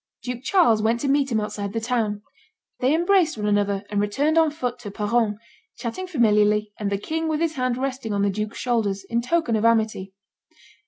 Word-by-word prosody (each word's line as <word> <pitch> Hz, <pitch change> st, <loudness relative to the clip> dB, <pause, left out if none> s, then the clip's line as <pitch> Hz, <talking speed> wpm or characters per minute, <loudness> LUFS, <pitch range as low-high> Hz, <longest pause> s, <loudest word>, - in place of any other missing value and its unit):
Duke 250 Hz, -1 st, -4 dB
Charles 265 Hz, -, +3 dB
went 225 Hz, +2 st, +1 dB
to 285 Hz, -, -1 dB
meet 275 Hz, -1 st, +2 dB
him 220 Hz, -, +2 dB
outside 210 Hz, -1 st, -4 dB
the 225 Hz, -, -1 dB
town. 220 Hz, -3 st, -1 dB, 0.6 s
They 260 Hz, +4 st, +2 dB
embraced 345 Hz, -, +2 dB
one 210 Hz, -, -3 dB
another, 205 Hz, -1 st, +1 dB
and 205 Hz, -1 st, +1 dB
returned 275 Hz, +10 st, +1 dB
on 325 Hz, -1 st, +4 dB
foot 250 Hz, -5 st, -4 dB
to 225 Hz, -4 st, -7 dB
Peronne, 210 Hz, +1 st, 0 dB, 0.4 s
chatting 275 Hz, +10 st, -5 dB
familiarly, 210 Hz, -, +2 dB
and 205 Hz, -2 st, -2 dB
the 200 Hz, -, +1 dB
king 320 Hz, +10 st, -3 dB
with 310 Hz, -1 st, 0 dB
his 330 Hz, -1 st, 0 dB
hand 255 Hz, -3 st, -1 dB
resting 260 Hz, -3 st, -3 dB
on 200 Hz, -1 st, 0 dB
the 200 Hz, -, +2 dB
duke's 210 Hz, +2 st, -4 dB
shoulder, 230 Hz, -5 st, 0 dB, 0.2 s
in 235 Hz, 0 st, +1 dB
token 305 Hz, -1 st, 0 dB
of 215 Hz, -, 0 dB
amity. 220 Hz, -4 st, +1 dB
230 Hz, 200 wpm, -23 LUFS, 210-275 Hz, 0.6 s, on